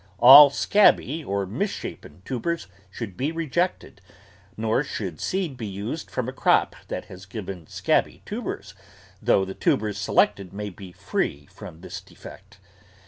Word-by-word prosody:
All 135 +6 +10
scabby 160 -1 +3
or 100 -4 -2
misshapen 95 - -5
tubers 135 +5 -3 0.2
should 100 0 -7
be 140 - -1
rejected, 165 +2 -2 0.6
nor 110 +5 +1
should 95 - -5
seed 180 -7 -2
be 115 -3 -5
used 105 +11 -5
from 125 -2 -3
a 130 - -4
crop - - +2
that - - -5
has 95 +1 -12
given 95 -5 -7
scabby - - 0
tubers, - - -5 0.5
though 95 - +3
the 95 - -6
tubers 105 +1 0
selected 95 -2 +1
may 105 0 -5
be 90 0 -11
free 70 -4 -3
from 80 - -11
this - - -7
defect. 100 +1 -14
110 Hz, 140 wpm, -24 LUFS, 95-140 Hz, 0.6 s, All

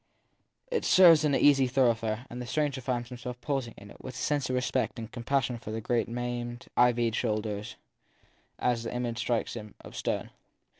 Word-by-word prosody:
It 475 - 0
serves 175 -4 +7
as 155 - 0
an 145 -2 +3
easy 135 -2 +5
thoroughfare, 120 -3 +1
and 120 +1 -7
the 125 - -6
stranger 140 +1 -1
finds 120 -1 -2
himself 125 0 -7
pausing 130 -3 -3
in 100 0 -12
it - - -15
with 130 - -7
a - - -7
sense 145 -3 0
of 130 - 0
respect 125 +1 0
and 115 -1 -7
compassion 130 0 -1
for 110 - -9
the 110 +1 -3
great 115 +1 0
maimed, 120 0 -4
ivied 120 -2 +3
shoulders 110 -1 -2 0.8
as 120 -2 +1
the 115 - -5
image 120 -1 -2
strikes 115 0 -1
him 105 -3 -8
of - - -12
stone. - - -2
120 Hz, 190 wpm, -29 LUFS, 115-130 Hz, 0.8 s, serves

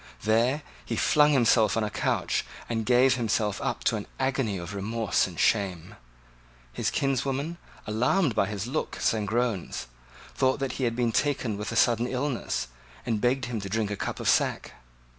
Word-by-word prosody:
There 120 +7 +2 0.2
he - - -3
flung 150 0 +4
himself 115 -6 +4
on 115 - +1
a 105 - -2
couch, - - 0 0.2
and 115 -2 -2
gave 125 +1 +5
himself 110 -3 0
up - - -2
to - - +2
an - - -7
agony 130 -6 0
of 85 +1 -6
remorse 110 +2 0
and 90 -3 -9
shame. 95 -3 +1 0.8
His 110 - -1
kinswoman, 135 +5 -1 0.3
alarmed 125 - +1
by 100 - +2
his 105 -1 -4
looks 130 -1 -1
and 105 -2 -2
groans, 110 - -1 0.5
thought 130 0 +2
that 135 -2 -1
he - - +2
had 115 -1 0
been 120 -1 +1
taken 130 -4 0
with 105 +3 -4
sudden 120 +1 +3
illness, 130 0 -2 0.4
and 110 -2 -1
begged 130 +1 +1
him 120 -3 -4
to 100 - -6
drink 105 0 -1
a - - -1
cup - - -4
of - - -3
sack. - - +2
115 Hz, 175 wpm, -27 LUFS, 105-130 Hz, 0.8 s, gave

